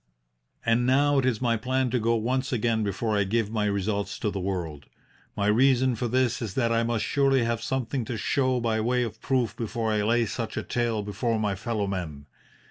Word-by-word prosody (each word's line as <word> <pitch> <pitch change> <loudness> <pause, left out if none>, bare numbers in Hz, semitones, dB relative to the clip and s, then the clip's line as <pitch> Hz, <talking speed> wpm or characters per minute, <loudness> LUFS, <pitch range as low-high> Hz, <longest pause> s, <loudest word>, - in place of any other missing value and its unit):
"And 115 +1 +2
now 140 +2 +4
it 130 - +1
is 125 -1 0
my 115 -1 +2
plan 130 +2 0
to 125 - +1
go 115 +1 +2
once 130 +5 -1
again 115 -2 +1
before 105 +2 -1
I 100 - +3
give 110 +2 0
my 110 -2 0
results 100 0 -1
to 105 - -1
the 100 - -4
world. 85 -7 -4 0.5
My 100 - 0
reason 130 +4 +4
for 120 +1 -2
this 125 0 +1
is 110 -5 -4
that 120 -3 +1
I 115 0 +2
must 115 -1 0
surely 135 -3 +2
have 115 -1 -1
something 130 0 -2
to 115 - -4
show 130 +3 +1
by 115 -2 0
way 125 +2 +1
of 110 -2 -6
proof 130 -4 0
before 115 -1 -2
I 105 -1 +1
lay 115 +3 +2
such 115 +1 -4
a - - -1
tale 115 -3 -1
before 110 +3 -1
my 105 -2 0
fellow 105 +1 -2
men. 85 -7 -5
115 Hz, 215 wpm, -26 LUFS, 105-125 Hz, 0.5 s, now